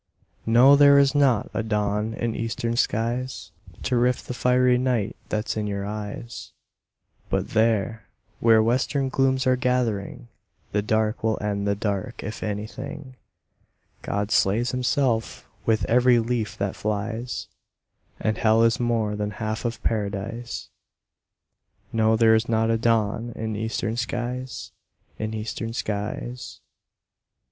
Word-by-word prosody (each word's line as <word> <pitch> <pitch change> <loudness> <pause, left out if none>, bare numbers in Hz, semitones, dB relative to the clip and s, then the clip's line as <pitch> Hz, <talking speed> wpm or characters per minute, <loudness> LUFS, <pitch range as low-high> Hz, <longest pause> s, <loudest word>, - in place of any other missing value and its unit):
No, 125 +5 +7
there 140 0 +7
is 140 -1 +4
not 135 -7 +2
a - - 0
dawn 105 0 -1
in 115 -1 -2
eastern 115 +1 -2
skies 120 +2 -1 0.3
To 130 - 0
rift 125 +1 +1
the - - -3
fiery 125 0 +3
night 125 -5 0
that's 110 +1 -2
in 105 -1 -2
your 100 -1 -3
eyes; 105 +3 -6 0.8
But - - -1
there, 110 0 +1 0.3
where 115 -1 +5
western 130 +4 +1
glooms 130 0 +1
are 130 0 +4
gathering 125 -3 -1 0.4
The 105 - +1
dark 110 +1 0
will 110 -1 +1
end 100 -1 -2
the 100 - +2
dark, 105 +3 -3
if 110 - -6
anything: 130 +6 -5 0.9
God 100 +1 -2
slays 115 +6 +2
Himself 125 -2 0 0.2
with 110 -3 +2
every 125 +1 +4
leaf 115 -2 -1
that 100 -1 -2
flies, 110 +3 -3 0.7
And 110 0 -1
hell 110 0 +4
is 115 -1 +3
more 115 -3 0
than 105 0 -2
half 110 +2 -4
of 120 0 -3
paradise. 110 +2 -3 1.2
No, 110 0 +3
there 110 0 +5
is 110 +1 +2
not 110 0 +2
a 115 - +2
dawn 115 0 +1
in 110 -1 -3
eastern 110 +1 -2
skies 125 +1 -4 0.5
In 110 0 -3
eastern 115 +1 -4
skies. 110 +2 -4
115 Hz, 135 wpm, -24 LUFS, 105-125 Hz, 1.2 s, No